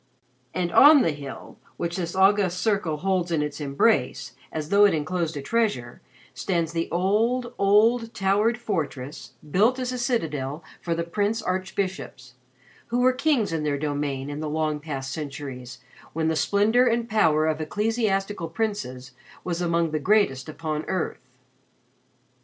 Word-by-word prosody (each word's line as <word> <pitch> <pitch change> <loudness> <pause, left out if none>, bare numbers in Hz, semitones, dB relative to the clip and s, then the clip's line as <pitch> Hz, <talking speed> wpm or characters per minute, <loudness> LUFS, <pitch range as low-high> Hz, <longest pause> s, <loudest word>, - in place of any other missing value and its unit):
And 175 -2 -1
on 290 - +8
the 165 - +2
hill 145 -2 -9 0.2
which 170 0 -3
this 175 -1 -3
august 190 -2 +3
circle 190 -7 0
holds 185 0 0
in 155 -3 +1
its 150 +1 -5
embrace, 145 +11 +1 0.2
as 155 -1 -4
though 205 +1 +6
it 200 - +3
enclosed 165 0 -2
a 140 - -5
treasure, 170 - -1 0.3
stands 170 -4 -1
the 165 0 -2
old, 225 +8 +1
old, 225 +4 +3
towered 205 +5 +2
fortress 150 - -4 0.2
built 220 - +3
as 255 -1 -2
a 250 - -4
citadel 160 - -2 0.2
for 170 -1 -1
the 170 - -1
Prince 205 +6 -1
Archbishops, 185 -9 -3 0.5
who 240 - -1
were 255 +1 +4
kings 255 - +1
in 160 - -1
their 150 -1 0
domain 145 -2 -2
in 145 - -5
the 155 -1 -3
long 155 -1 -1
past 135 -3 -5
centuries 135 -4 -6 0.4
when 160 0 0
the 160 - 0
splendor 215 +9 +3
and 235 0 +1
power 160 -9 +3
of 155 0 0
ecclesiastical 205 -1 -1
princes 160 - -3 0.3
was 175 -1 -3
among 170 -2 +1
the 155 - -1
greatest 160 -7 +2
upon 155 0 -3
earth. 180 -8 -3
170 Hz, 150 wpm, -25 LUFS, 150-210 Hz, 0.5 s, on